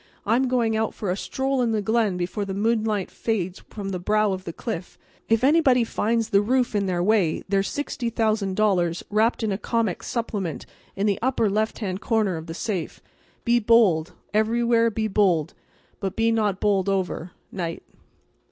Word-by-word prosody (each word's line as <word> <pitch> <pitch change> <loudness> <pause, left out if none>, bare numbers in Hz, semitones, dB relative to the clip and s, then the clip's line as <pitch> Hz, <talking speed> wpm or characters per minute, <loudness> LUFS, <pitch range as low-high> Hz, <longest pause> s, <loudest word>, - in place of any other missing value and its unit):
I'm 240 +5 +2
going 235 -3 +1
out 220 0 -1
for 205 -5 -2
a - - 0
stroll 265 +5 -1
in 235 -2 +1
the 215 - +1
glen 220 -3 +1
before 180 +4 -2
the 195 -1 -4
moonlight 215 -2 0
fades 190 -5 -2
from 200 -2 -6
the 185 -2 -3
brow 210 +3 +2
of 185 0 -6
the 170 - -4
cliff. 180 0 -6 0.3
If 225 +1 +3
anybody 270 -4 +4
finds 225 0 0
the 200 -2 +4
roof 250 +3 +1
in 200 -2 0
their 175 -1 0
way 195 -5 +2
there's 195 0 +1
$60,000 215 - 0
wrapped 220 +3 +2
in 215 - 0
a 195 - -2
comic 230 -6 -1
supplement 205 - -3 0.3
in 195 - -1
the 205 -2 +1
upper 235 -4 +1
left 215 +2 0
hand 195 -3 -4
corner 220 -6 +1
of 160 +1 -7
the 165 - -6
safe. 190 -5 -3 0.5
Be 240 0 +4
bold; 210 -8 +3 0.2
everywhere 230 +2 +3
be 220 0 -1
bold, 190 -7 +2 0.5
but 195 -1 -3
be 225 0 +2
not 210 -4 +1
bowled 200 -2 +1
over. 185 -2 -2 0.2
'Night." 170 -3 -4
215 Hz, 175 wpm, -24 LUFS, 190-230 Hz, 0.5 s, anybody